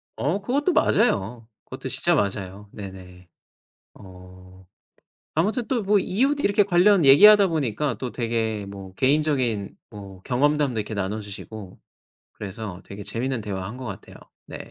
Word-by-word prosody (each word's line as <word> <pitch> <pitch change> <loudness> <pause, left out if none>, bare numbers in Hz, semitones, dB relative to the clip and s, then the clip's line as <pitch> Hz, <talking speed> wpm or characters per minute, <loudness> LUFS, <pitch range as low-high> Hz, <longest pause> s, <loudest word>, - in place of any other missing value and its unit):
어 170 +9 -1
그것도 285 - 0
맞아요. 115 - +1 0.2
그것도 - - -7
진짜 - - +1
맞아요. 100 0 -3
네네. 90 -3 -11 0.7
어 90 0 -15 0.7
아무튼 215 - 0
또 245 -5 -1
뭐 200 +1 +3
이웃 270 +11 0
이렇게 205 -5 +3
관련 185 -1 +4
얘기하다 200 +9 +8
보니까 140 - -1
또 125 0 -5
되게 115 -3 -2
뭐 100 -1 -10
개인적인 130 -5 0
뭐 100 -3 -11
경험담도 140 -1 +1
이렇게 105 +1 -4
나눠 100 +1 -2
주시고 100 -1 -9 0.5
그래서 100 -2 -7
되게 100 +1 -9
재미있는 125 +3 -3
대화한 100 +1 -5
것 130 - -8
같아요. 100 -5 -9 0.3
네. - - -8
115 Hz, 305 characters per minute, -24 LUFS, 100-155 Hz, 0.7 s, 얘기하다